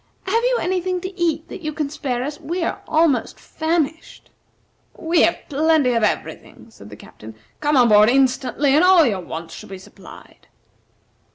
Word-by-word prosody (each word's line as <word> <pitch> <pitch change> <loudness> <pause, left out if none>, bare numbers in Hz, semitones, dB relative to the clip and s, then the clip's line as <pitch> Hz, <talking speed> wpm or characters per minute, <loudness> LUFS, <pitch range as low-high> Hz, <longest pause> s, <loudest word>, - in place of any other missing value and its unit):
Have 455 +5 0
you - - +2
any 365 +1 -1
thing 365 0 -2
to 375 +1 -7
eat 330 -3 -1
that 380 - -9
you 310 -2 -4
can 290 -2 -4
spare 260 -5 -3
us? 295 +2 -6
We 335 +3 -4
are - - -3
almost 310 -7 +1
famished." 315 -1 -4 0.7
"We 330 +1 +1
have 340 - +3
plenty 300 -3 +2
of 230 - 0
every 210 - -1
thing," 230 - -19
said 105 - -15
the 105 - -11
Captain. 110 +1 -14 0.2
"Come 295 -1 +1
on 245 -2 +5
board 210 +1 +6
instantly, 265 +1 +1
and 305 +4 +4
all 365 -3 +6
your 200 -7 -1
wants 165 -1 -8
shall - - -11
be 195 - -8
supplied." 185 - -16
300 Hz, 185 wpm, -20 LUFS, 245-335 Hz, 0.7 s, board